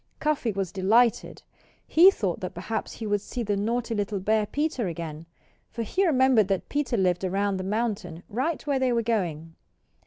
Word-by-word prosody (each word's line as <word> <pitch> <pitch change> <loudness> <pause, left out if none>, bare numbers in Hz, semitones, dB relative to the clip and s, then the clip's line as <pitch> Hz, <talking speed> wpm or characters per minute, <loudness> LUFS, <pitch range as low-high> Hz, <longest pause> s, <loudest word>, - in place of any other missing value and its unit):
Cuffy 300 -6 0
was 195 -3 -3
delighted. 220 +5 +2 0.4
He 345 +4 +7
thought 195 - -2
that 185 - -6
perhaps 215 +5 -4
he 225 - -7
would 205 -1 0
see 240 +3 -5
the 205 -2 0
naughty 230 +3 -1
little 205 -1 -2
bear 215 +2 +1
Peter 290 -6 -1
again; 165 -2 -6 0.4
for 230 - -4
he 370 - +1
remembered 260 - +4
that 195 -2 -2
Peter 280 -5 -1
lived 180 -2 +1
around 195 +1 0
the 185 - -4
mountain, 200 -4 -3
right 270 +11 -2
where 280 -2 +1
they 260 -1 +2
were 235 -1 +1
going. 170 -8 -2
215 Hz, 180 wpm, -26 LUFS, 190-245 Hz, 0.4 s, He